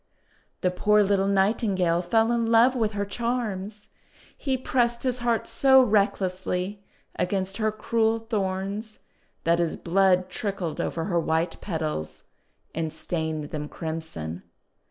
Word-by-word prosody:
The 180 Hz, -, +2 dB
poor 210 Hz, +3 st, +3 dB
little 195 Hz, -1 st, +2 dB
Nightingale 195 Hz, -3 st, +2 dB
fell 225 Hz, +6 st, +2 dB
in 235 Hz, -1 st, +1 dB
love 230 Hz, +3 st, +5 dB
with 220 Hz, -3 st, 0 dB
her 205 Hz, 0 st, -1 dB
charms. 210 Hz, -3 st, -3 dB, 0.5 s
He 265 Hz, -2 st, -1 dB
pressed 240 Hz, -2 st, +1 dB
his 255 Hz, -1 st, 0 dB
heart 235 Hz, -2 st, 0 dB
so 265 Hz, +3 st, +5 dB
recklessly 195 Hz, -2 st, 0 dB, 0.3 s
against 190 Hz, +1 st, -1 dB
her 215 Hz, -1 st, +1 dB
cruel 225 Hz, +1 st, +1 dB
thorns 205 Hz, 0 st, -3 dB, 0.5 s
that 170 Hz, +1 st, +2 dB
his 170 Hz, -2 st, 0 dB
blood 185 Hz, +1 st, +2 dB
trickled 190 Hz, -3 st, -3 dB
over 165 Hz, -, -2 dB
her 175 Hz, -4 st, +1 dB
white 165 Hz, +1 st, -1 dB
petals, 155 Hz, -, -3 dB, 0.5 s
and 160 Hz, -1 st, -2 dB
stained 160 Hz, -3 st, -3 dB
them 150 Hz, -1 st, -4 dB
crimson. 160 Hz, -, -5 dB
195 Hz, 130 wpm, -26 LUFS, 175-225 Hz, 0.5 s, love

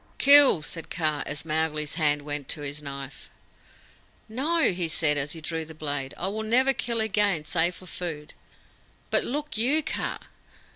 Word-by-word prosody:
"Kill!" 280 Hz, -, +7 dB
said 165 Hz, +2 st, -5 dB
Kaa, 155 Hz, -3 st, -1 dB
as 145 Hz, +1 st, -5 dB
Mowgli's 155 Hz, -1 st, -1 dB
hand 150 Hz, -3 st, +1 dB
went 145 Hz, -2 st, -4 dB
to 150 Hz, -, -3 dB
his 145 Hz, +1 st, -5 dB
knife. 140 Hz, -1 st, -8 dB, 1.0 s
"No," 285 Hz, +7 st, +1 dB
he 175 Hz, -2 st, -1 dB
said, 155 Hz, -2 st, +2 dB
as 145 Hz, 0 st, -2 dB
he 165 Hz, -, -8 dB
drew 160 Hz, +1 st, -3 dB
the 160 Hz, 0 st, -12 dB
blade; 145 Hz, -3 st, -3 dB
"I 185 Hz, -, -2 dB
will 215 Hz, +2 st, -4 dB
never 255 Hz, +5 st, +3 dB
kill 235 Hz, -2 st, -1 dB
again 205 Hz, -7 st, +1 dB
save 170 Hz, +2 st, +1 dB
for 185 Hz, -, -13 dB
food. 165 Hz, -4 st, -6 dB, 0.8 s
But -, -, +4 dB
look 295 Hz, -3 st, -3 dB
you, 285 Hz, +7 st, +2 dB
Kaa!" 315 Hz, -, -3 dB
160 Hz, 165 wpm, -26 LUFS, 150-220 Hz, 1.0 s, Kill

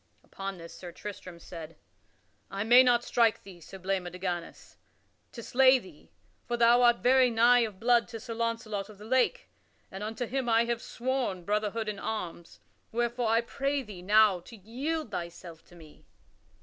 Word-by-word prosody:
Upon 195 Hz, -1 st, -7 dB
this 170 Hz, -1 st, -11 dB
Sir 175 Hz, -1 st, -9 dB
Tristram 185 Hz, -1 st, -9 dB
said: 165 Hz, -1 st, -10 dB, 0.7 s
"I 195 Hz, +1 st, -3 dB
may 240 Hz, +3 st, +7 dB
not 245 Hz, -2 st, +3 dB
strike 230 Hz, -3 st, +2 dB
thee, 185 Hz, -3 st, -13 dB
Sir 190 Hz, -, -11 dB
Blamor 185 Hz, -1 st, -2 dB
de 180 Hz, -, -9 dB
Ganys, 175 Hz, -2 st, -5 dB, 0.5 s
to 235 Hz, -, -9 dB
slay 260 Hz, +2 st, +5 dB
thee, 185 Hz, -10 st, -14 dB, 0.4 s
for 240 Hz, -, -1 dB
thou 235 Hz, +1 st, +5 dB
art 240 Hz, -1 st, +4 dB
very 255 Hz, 0 st, +5 dB
nigh 240 Hz, +2 st, +5 dB
of 215 Hz, -5 st, -2 dB
blood 240 Hz, +1 st, +3 dB
to 230 Hz, -2 st, -8 dB
Sir 230 Hz, +1 st, -7 dB
Launcelot 225 Hz, -3 st, -3 dB
of 210 Hz, -, -13 dB
the 210 Hz, -, -12 dB
Lake, 260 Hz, -, +1 dB, 0.4 s
and 190 Hz, +2 st, -7 dB
unto 220 Hz, +3 st, -3 dB
him 255 Hz, 0 st, -2 dB
I 230 Hz, +1 st, +4 dB
have 235 Hz, 0 st, -2 dB
sworn 245 Hz, -7 st, -3 dB
brotherhood 210 Hz, +2 st, -1 dB
in 210 Hz, -2 st, -4 dB
arms; 175 Hz, -6 st, -6 dB, 0.3 s
wherefore 240 Hz, +1 st, -1 dB
I 225 Hz, +1 st, +3 dB
pray 275 Hz, +3 st, -2 dB
thee 205 Hz, -6 st, -10 dB
now 205 Hz, 0 st, +4 dB
to 230 Hz, +7 st, -13 dB
yield 260 Hz, -, -4 dB
thyself 170 Hz, -2 st, -7 dB
to 175 Hz, -, -18 dB
me." 155 Hz, -3 st, -17 dB
220 Hz, 175 wpm, -29 LUFS, 190-240 Hz, 0.7 s, may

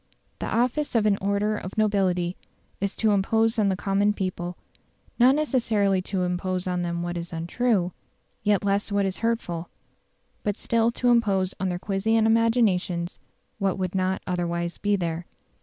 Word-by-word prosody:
The -, -, -3 dB
office 250 Hz, +5 st, 0 dB
of 220 Hz, -2 st, +3 dB
an 210 Hz, -2 st, +4 dB
order 200 Hz, +2 st, +1 dB
of 190 Hz, -1 st, -7 dB
nobility 190 Hz, -4 st, +1 dB, 0.4 s
is 200 Hz, 0 st, -2 dB
to 220 Hz, -1 st, +2 dB
impose 225 Hz, +3 st, +2 dB
on 205 Hz, -2 st, +3 dB
the 190 Hz, -, +1 dB
common 200 Hz, +2 st, +1 dB
people 180 Hz, -3 st, -4 dB, 0.6 s
not 255 Hz, +3 st, +6 dB
necessarily 225 Hz, -10 st, +1 dB
to 185 Hz, 0 st, -2 dB
impose 180 Hz, +1 st, -1 dB
on 180 Hz, -1 st, -1 dB
them 170 Hz, 0 st, -2 dB
what 175 Hz, 0 st, -3 dB
is 170 Hz, 0 st, -6 dB
untrue, 180 Hz, +3 st, 0 dB, 0.5 s
yet 205 Hz, -1 st, +2 dB
less 200 Hz, +1 st, 0 dB
what 200 Hz, 0 st, +2 dB
is 190 Hz, -1 st, -3 dB
hurtful; 200 Hz, -8 st, -2 dB, 0.7 s
but 205 Hz, -1 st, -1 dB
still 230 Hz, +1 st, +1 dB
to 245 Hz, 0 st, +1 dB
impose 195 Hz, -5 st, +2 dB
on 190 Hz, 0 st, 0 dB
their 175 Hz, -, -2 dB
quiescent 215 Hz, +4 st, +1 dB
imaginations 220 Hz, -6 st, +2 dB, 0.4 s
what 195 Hz, -2 st, 0 dB
would 185 Hz, -2 st, -2 dB
not 185 Hz, 0 st, 0 dB
otherwise 170 Hz, -1 st, -2 dB
be 205 Hz, 0 st, +2 dB
there. 170 Hz, -2 st, -3 dB
195 Hz, 160 wpm, -25 LUFS, 180-220 Hz, 0.7 s, not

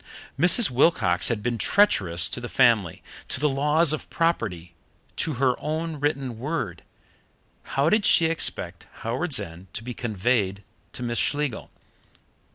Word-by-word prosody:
Mrs. 180 Hz, -, +5 dB
Wilcox 120 Hz, -, +2 dB
had 110 Hz, -3 st, -1 dB
been 120 Hz, -1 st, -2 dB
treacherous 95 Hz, -, +3 dB
to 125 Hz, -, -3 dB
the 120 Hz, -, -6 dB
family, 115 Hz, -10 st, +2 dB, 0.2 s
to -, -, -3 dB
the 150 Hz, -, +2 dB
laws 150 Hz, +3 st, +2 dB
of 155 Hz, -, -6 dB
property, 100 Hz, -, -2 dB, 0.4 s
to 160 Hz, -, 0 dB
her 130 Hz, 0 st, +1 dB
own 160 Hz, 0 st, -4 dB
written 135 Hz, -5 st, -2 dB
word. 130 Hz, -, -4 dB, 1.0 s
How 140 Hz, +2 st, +3 dB
did 210 Hz, +5 st, +2 dB
she 165 Hz, -, +5 dB
expect 165 Hz, 0 st, -3 dB, 0.2 s
Howards 130 Hz, +5 st, 0 dB
End 90 Hz, -2 st, -10 dB
to 110 Hz, -, -5 dB
be 125 Hz, +1 st, -6 dB
conveyed 105 Hz, -3 st, -1 dB, 0.3 s
to 125 Hz, -, -7 dB
Miss 120 Hz, -1 st, -2 dB
Schlegel? 145 Hz, -4 st, -2 dB
125 Hz, 145 wpm, -24 LUFS, 105-155 Hz, 1.0 s, Mrs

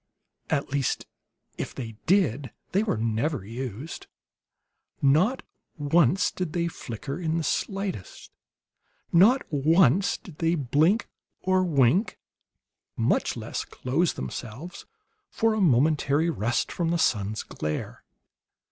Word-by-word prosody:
At 140 Hz, -, 0 dB
least, 140 Hz, -3 st, -1 dB, 0.5 s
if -, -, -4 dB
they 115 Hz, -4 st, -5 dB, 0.2 s
did, 145 Hz, -, +2 dB, 0.2 s
they 195 Hz, -, +2 dB
were 215 Hz, -, 0 dB
never 115 Hz, +2 st, -1 dB
used. 125 Hz, +5 st, -6 dB, 0.9 s
Not 160 Hz, -, +3 dB, 0.3 s
once 155 Hz, +3 st, +3 dB
did 180 Hz, -4 st, -4 dB
they 170 Hz, -1 st, 0 dB
flicker 135 Hz, +2 st, -6 dB
in 165 Hz, -2 st, -1 dB
the 165 Hz, -, -1 dB
slightest; 195 Hz, -, -3 dB, 0.8 s
not 215 Hz, +10 st, +6 dB
once 160 Hz, +4 st, +4 dB
did 170 Hz, -6 st, -14 dB
they 165 Hz, +1 st, +2 dB
blink 155 Hz, -, +2 dB, 0.3 s
or 185 Hz, 0 st, +2 dB
wink, 160 Hz, -, +2 dB, 0.8 s
much -, -, +1 dB
less -, -, -4 dB
close 155 Hz, +7 st, -1 dB
themselves 115 Hz, -, -7 dB, 0.4 s
for 225 Hz, 0 st, +1 dB
a 215 Hz, -, 0 dB
momentary 150 Hz, +1 st, +3 dB
rest 120 Hz, -5 st, -1 dB
from 170 Hz, -2 st, -1 dB
the 170 Hz, -, +1 dB
sun's 110 Hz, -8 st, 0 dB
glare. 75 Hz, 0 st, -5 dB
155 Hz, 115 wpm, -26 LUFS, 125-180 Hz, 0.9 s, not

